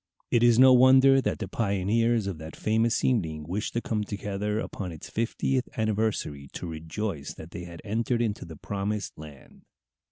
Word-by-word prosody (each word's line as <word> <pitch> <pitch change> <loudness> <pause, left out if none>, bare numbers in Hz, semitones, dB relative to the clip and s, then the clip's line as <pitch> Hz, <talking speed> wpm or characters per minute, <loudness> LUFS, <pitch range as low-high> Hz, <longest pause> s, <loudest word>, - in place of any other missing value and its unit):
It 120 - +4
is 120 -1 +5
no 130 +1 +8
wonder 130 +1 +7
that - - -1
the - - -4
pioneers 110 +2 +1
of 95 -5 -4
that 80 +1 -8
famous 110 +1 +1
evening 80 -12 0
wished 100 +5 -3
to 120 - +1
come 110 -2 -1
together 105 0 -3
upon 95 -5 -5
its 80 - -10
fiftieth 125 +3 -1
anniversary 110 -10 -1
to - - -6
rejoice 80 0 -5
that 80 +2 -11
they 90 -3 -7
had 85 -1 -11
entered 115 +3 0
into 110 -2 -2
the 80 -2 -10
promised 100 +3 -3
land. 75 -3 -13
105 Hz, 170 wpm, -27 LUFS, 85-115 Hz, -, no